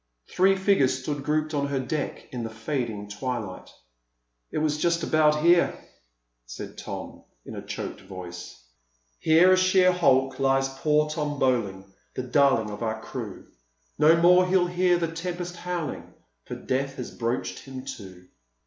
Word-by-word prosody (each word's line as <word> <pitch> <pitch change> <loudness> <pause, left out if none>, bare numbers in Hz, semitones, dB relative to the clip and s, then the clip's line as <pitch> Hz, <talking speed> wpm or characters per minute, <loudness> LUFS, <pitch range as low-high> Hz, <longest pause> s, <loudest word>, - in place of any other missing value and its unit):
Three 195 +1 +4
figures 190 -10 +2
stood 145 0 -3
grouped 155 +2 0
on 140 -1 0
her 140 -1 -1
deck 145 +3 -4
in 125 - -4
the 115 - -4
fading 110 -3 -4
twilight. 105 -3 -5 0.8
"It - - -5
was 150 -1 0
just 170 0 +1
about 150 -1 +3
here," 170 0 +4 0.7
said - - -8
Don - - -7 0.2
in - - -8
a - - -6
choked - - -6
voice: 90 -8 -9 0.6
"Here, 165 +4 +5
a - - +6
sheer 185 0 +4
hulk, 135 -7 +2
lies 135 0 +2
poor 150 +3 +1
Tom 150 -1 -3
Bowling, 105 -8 0 0.3
The 130 - -3
darling 130 -4 +2
of 105 - -8
our 110 -1 -2
crew; 110 -3 -7 0.5
No 160 +2 +6
more 180 +2 +6
he'll 185 -1 +3
hear 180 0 +2
the 170 -1 -1
tempest 175 +1 -5
howling, 175 -4 -5 0.3
For - - -6
death 135 +1 -2
has 125 - -6
broached 120 +1 -2
him 130 -1 -9
to. 95 -3 -13
140 Hz, 155 wpm, -26 LUFS, 120-170 Hz, 0.8 s, a